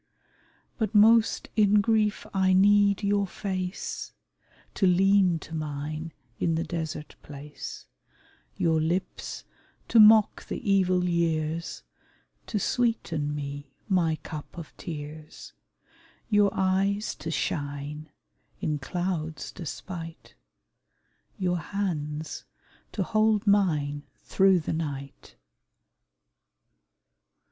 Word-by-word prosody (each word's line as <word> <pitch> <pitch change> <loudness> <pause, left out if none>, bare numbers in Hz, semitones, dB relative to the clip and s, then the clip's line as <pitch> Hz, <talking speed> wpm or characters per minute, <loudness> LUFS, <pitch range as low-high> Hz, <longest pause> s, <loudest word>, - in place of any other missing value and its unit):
But 220 -2 -1
most 220 +2 +5
in 210 -1 +5
grief 215 0 +1
I 190 -1 +3
need 200 +1 +4
your 200 0 +1
face 185 -1 -4 0.6
To 195 - +2
lean 190 -1 +4
to 160 - -11
mine 155 +1 -4 0.3
in 165 -1 +1
the 165 - 0
desert 160 -3 -5
place; 145 0 -9 0.7
Your 160 -1 +2
lips 170 +4 -3 0.5
to 230 - +5
mock 215 0 +7
the - - -3
evil 185 -2 +3
years, 165 -1 -1 0.6
To 215 - -2
sweeten 175 -10 0
me 140 -1 -6
my 175 -5 +2
cup 155 +2 -8
of 165 -3 -9
tears, 155 -1 -8 0.8
Your 205 -1 +5
eyes 195 +3 0
to 165 - -6
shine, 145 0 -3 0.5
in 150 -1 -1
cloud's 160 0 -3
despite, 165 0 -8 1.0
Your 180 -3 0
hands 155 -5 -4 0.5
to 200 - -1
hold 215 +1 +2
mine 155 -8 +2 0.2
through 190 -2 +3
the 155 - -3
night. 140 -4 -6
175 Hz, 100 wpm, -27 LUFS, 155-200 Hz, 1.0 s, mock